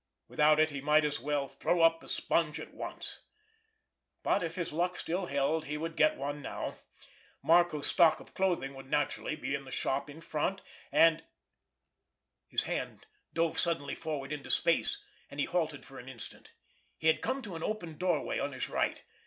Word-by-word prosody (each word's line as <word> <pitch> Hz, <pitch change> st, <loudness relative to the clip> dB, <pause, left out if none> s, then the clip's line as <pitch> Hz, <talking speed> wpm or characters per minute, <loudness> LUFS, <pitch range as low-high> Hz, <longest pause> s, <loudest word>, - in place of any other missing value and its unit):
Without 150 Hz, 0 st, +4 dB
it 155 Hz, 0 st, +4 dB
he 140 Hz, -1 st, -5 dB
might 150 Hz, +2 st, +4 dB
as 145 Hz, -1 st, -1 dB
well 145 Hz, -1 st, -1 dB
throw 155 Hz, +5 st, 0 dB
up 165 Hz, 0 st, +5 dB
the -, -, -13 dB
sponge 155 Hz, -2 st, 0 dB
at -, -, -9 dB
once, -, -, -5 dB, 1.0 s
but -, -, +2 dB
if 165 Hz, -1 st, -3 dB
his 170 Hz, -4 st, -3 dB
luck 175 Hz, +3 st, 0 dB
still 180 Hz, +2 st, -2 dB
held 140 Hz, +3 st, 0 dB
he 150 Hz, +1 st, -3 dB
would 165 Hz, +1 st, -4 dB
get 310 Hz, -, +4 dB
one 145 Hz, +1 st, -4 dB
now. -, -, -4 dB, 0.7 s
Marco's 170 Hz, -3 st, +4 dB
stock 165 Hz, -3 st, +6 dB
of -, -, -14 dB
clothing 175 Hz, -8 st, 0 dB
would 135 Hz, 0 st, -11 dB
naturally 150 Hz, +1 st, 0 dB
be 150 Hz, -, -4 dB
in 145 Hz, -2 st, -2 dB
the 135 Hz, -, -11 dB
shop 135 Hz, +2 st, -1 dB
in 145 Hz, +2 st, -10 dB
front, 165 Hz, +4 st, -2 dB, 0.3 s
and—— 165 Hz, 0 st, +5 dB, 1.3 s
His -, -, 0 dB
hand -, -, -4 dB, 0.3 s
dove 165 Hz, -1 st, +2 dB
suddenly 165 Hz, -5 st, +1 dB
forward 150 Hz, -3 st, -4 dB
into 150 Hz, -3 st, -5 dB
space, -, -, +3 dB, 0.3 s
and 140 Hz, -, -9 dB
he -, -, +2 dB
halted 160 Hz, -5 st, -1 dB
for 135 Hz, -1 st, -11 dB
an 125 Hz, -, -10 dB
instant. 120 Hz, -4 st, -9 dB, 0.5 s
He -, -, -9 dB
had 160 Hz, 0 st, +4 dB
come 260 Hz, +2 st, -1 dB
to 200 Hz, -6 st, -6 dB
an 165 Hz, -, -6 dB
open 175 Hz, -6 st, -4 dB
doorway 180 Hz, -4 st, 0 dB
on 140 Hz, 0 st, -2 dB
his 130 Hz, -, -4 dB
right. -, -, -1 dB
155 Hz, 185 wpm, -31 LUFS, 145-170 Hz, 1.3 s, stock